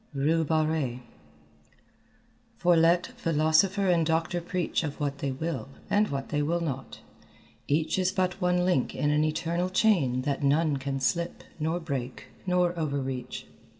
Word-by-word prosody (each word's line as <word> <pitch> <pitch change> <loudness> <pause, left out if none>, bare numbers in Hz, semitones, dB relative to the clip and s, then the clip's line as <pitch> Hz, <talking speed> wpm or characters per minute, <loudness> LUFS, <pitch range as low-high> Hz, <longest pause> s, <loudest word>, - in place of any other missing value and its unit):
RUE 155 +4 +2
BARRÉE 155 -5 0 1.6
"For 175 0 +4
let 170 +2 +4
Philosopher 165 +2 +2
and 175 -2 +3
Doctor 165 +2 0
preach 175 -1 -1
Of 145 -2 -4
what 140 -1 -2
they 140 - -1
will 160 +2 -4 0.2
and 210 +1 +4
what 135 -1 -4
they 150 -1 0
will 165 +4 0
not, 140 -6 -5 0.7
each 155 +5 +1
Is 185 0 +2
but 185 0 -1
one 180 0 +2
link 180 -9 +1
in 145 - +1
an 150 +1 +3
eternal 165 +3 -1
chain 170 - +2
That 140 0 -1
none 145 +1 +2
can 135 0 -3
slip 170 +6 -1 0.2
nor 160 +3 0
break 135 -6 -5 0.2
nor 180 -1 +2
over 145 -3 -1
reach." 130 -2 -5
160 Hz, 150 wpm, -28 LUFS, 140-175 Hz, 1.6 s, For